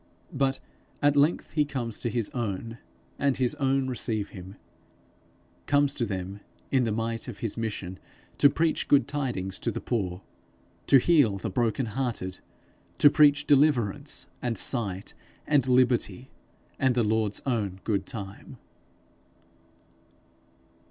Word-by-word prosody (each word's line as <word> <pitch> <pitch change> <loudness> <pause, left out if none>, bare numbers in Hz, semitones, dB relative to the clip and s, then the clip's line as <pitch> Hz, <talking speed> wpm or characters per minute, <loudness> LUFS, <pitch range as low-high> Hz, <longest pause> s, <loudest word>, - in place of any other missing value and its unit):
But 135 0 0 0.4
at 145 0 +3
length 145 +4 +2
he 150 0 +2
comes 130 -6 -4
to 120 - -1
his 115 -1 -2
own, 115 0 -4 0.4
and 140 -1 +1
his 125 0 +1
own 135 -1 +1
receive 110 -5 -2
him; 95 +1 -10 1.1
comes 145 -1 +3
to 120 -5 -1
them 95 0 -5 0.3
in 130 -3 +3
the 110 - 0
might 115 +2 -2
of 120 -5 -7
his 110 +1 -3
mission 105 -5 -4 0.4
to 145 - +7
preach 160 +2 0
good 140 -1 +4
tidings 120 -10 -3
to - - -1
the - - -3
poor, 95 -6 -3 0.6
to 135 - +7
heal 135 -8 +4
the 95 - -4
broken 120 +4 0
hearted, 110 -6 -3 0.6
to 145 - +7
preach 145 -1 +5
deliverance, 140 -8 +2
and 120 -3 -2
sight, 100 -5 -1 0.3
and 140 -4 +2
liberty, 125 0 +2 0.5
and 130 -2 +2
the 120 - +3
Lord's 110 -1 0
own 105 -8 -1
good 100 -4 -1
time. 100 -3 -8
120 Hz, 135 wpm, -27 LUFS, 105-135 Hz, 1.1 s, to